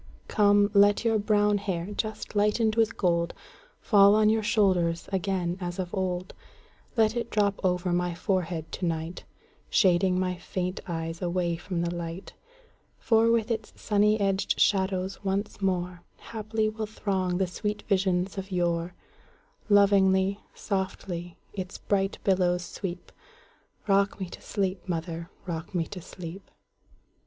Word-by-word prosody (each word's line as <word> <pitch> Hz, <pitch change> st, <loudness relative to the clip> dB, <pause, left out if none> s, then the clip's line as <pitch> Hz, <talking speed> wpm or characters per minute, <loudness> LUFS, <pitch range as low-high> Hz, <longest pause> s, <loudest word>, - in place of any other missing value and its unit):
Come, 205 Hz, -1 st, +4 dB
let 205 Hz, +2 st, +5 dB
your 225 Hz, -1 st, +3 dB
brown 210 Hz, 0 st, +2 dB
hair, 190 Hz, -3 st, -3 dB
just 215 Hz, -1 st, -4 dB
lighted 210 Hz, +2 st, +2 dB
with 225 Hz, 0 st, +2 dB
gold, 170 Hz, -2 st, +1 dB, 0.5 s
Fall 200 Hz, -2 st, +6 dB
on 215 Hz, 0 st, +5 dB
your 220 Hz, 0 st, +2 dB
shoulders 185 Hz, -6 st, +2 dB
again 185 Hz, -2 st, -1 dB
as 175 Hz, 0 st, -4 dB
of 180 Hz, -2 st, -4 dB
old; 185 Hz, -1 st, -2 dB, 0.6 s
Let 220 Hz, 0 st, +3 dB
it 235 Hz, -1 st, -2 dB
drop 205 Hz, -2 st, 0 dB
over 180 Hz, -1 st, +1 dB
my 175 Hz, -1 st, 0 dB
forehead 175 Hz, -3 st, -2 dB
to 185 Hz, -, -3 dB
night, 165 Hz, +1 st, -4 dB, 0.4 s
Shading 185 Hz, -1 st, +3 dB
my 180 Hz, -1 st, -1 dB
faint 180 Hz, +1 st, -3 dB
eyes 165 Hz, -1 st, -4 dB
away 175 Hz, -1 st, 0 dB
from 175 Hz, +1 st, -3 dB
the 170 Hz, 0 st, -1 dB
light; 170 Hz, +1 st, -6 dB, 0.6 s
For 225 Hz, 0 st, +3 dB
with 230 Hz, 0 st, +2 dB
its 220 Hz, -1 st, -3 dB
sunny 210 Hz, 0 st, +2 dB
edged 195 Hz, -1 st, 0 dB
shadows 190 Hz, 0 st, +1 dB
once 200 Hz, +2 st, -2 dB
moreHaply 200 Hz, +4 st, -2 dB
will 215 Hz, -1 st, -4 dB
throng 190 Hz, -4 st, -1 dB
the 190 Hz, -, +2 dB
sweet 210 Hz, +3 st, -4 dB
visions 190 Hz, 0 st, 0 dB
of 195 Hz, +1 st, -7 dB
yore; 175 Hz, -1 st, 0 dB, 0.7 s
Lovingly, 195 Hz, -1 st, +4 dB, 0.2 s
softly, 185 Hz, -3 st, -4 dB, 0.2 s
its 185 Hz, -2 st, -5 dB
bright 195 Hz, -1 st, 0 dB
billows 180 Hz, -2 st, +2 dB
sweep;—Rock 200 Hz, -, -4 dB
me 190 Hz, -2 st, -4 dB
to -, -, -10 dB
sleep, 190 Hz, -2 st, -3 dB
mother,—rock 170 Hz, +1 st, -5 dB
me 170 Hz, -2 st, +1 dB
to 190 Hz, 0 st, -8 dB
sleep! 180 Hz, +2 st, -9 dB
190 Hz, 135 wpm, -27 LUFS, 175-205 Hz, 0.7 s, Fall